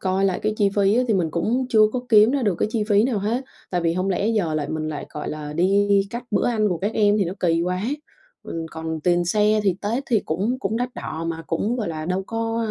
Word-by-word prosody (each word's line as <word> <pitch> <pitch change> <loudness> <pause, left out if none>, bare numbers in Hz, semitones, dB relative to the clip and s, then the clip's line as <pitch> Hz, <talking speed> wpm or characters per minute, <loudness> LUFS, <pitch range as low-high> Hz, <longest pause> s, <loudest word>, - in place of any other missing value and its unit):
coi 190 +1 0
lại 190 -2 +1
cái 215 0 0
chi 200 -1 +3
phí 200 0 +4
á, 250 - +4
thì 220 - +3
mình 170 -5 +1
cũng 235 +11 0
chưa 220 -4 +4
có 255 - -1
kiếm 215 +1 +6
ra 275 -2 0
được 200 -5 +2
cái - - +1
chi 220 -3 0
phí 205 +1 +4
nào 245 -5 0
hết. 230 +6 -1 0.3
Tại 180 -1 0
vì 165 0 +1
hông 185 +2 -1
lẽ 200 +3 0
giờ 190 -9 0
lại 145 -2 -2
mình 155 0 -3
lại, 150 -2 -5
gọi 150 - -5
là, 150 -1 -6
đi 195 +5 +2 0.2
cắt 235 +1 -5
bữa - - +1
ăn 215 -3 +1
của 175 -3 -1
các 205 +3 -2
em 205 -1 +3
thì 195 - +2
nó 170 - -3
kỳ 165 -1 +2
quá. 180 +1 -1 0.6
Ừm, 165 -1 -5
còn 160 0 -5
tiền 175 +2 +2
xe 210 +3 +2
thì 190 -3 +2
Tết 230 +6 -1
thì 230 -5 +2
cũng 200 +12 -2
cũng 225 -4 -2
đắt 245 +1 -3
đỏ 160 +1 -5
mà 165 0 -4
cũng, 210 +9 -1
gọi 220 -7 -2
là, 155 -1 -4
đâu 185 +1 -1
có, 225 0 -2
a, - - -2
200 Hz, 275 wpm, -23 LUFS, 170-220 Hz, 0.6 s, kiếm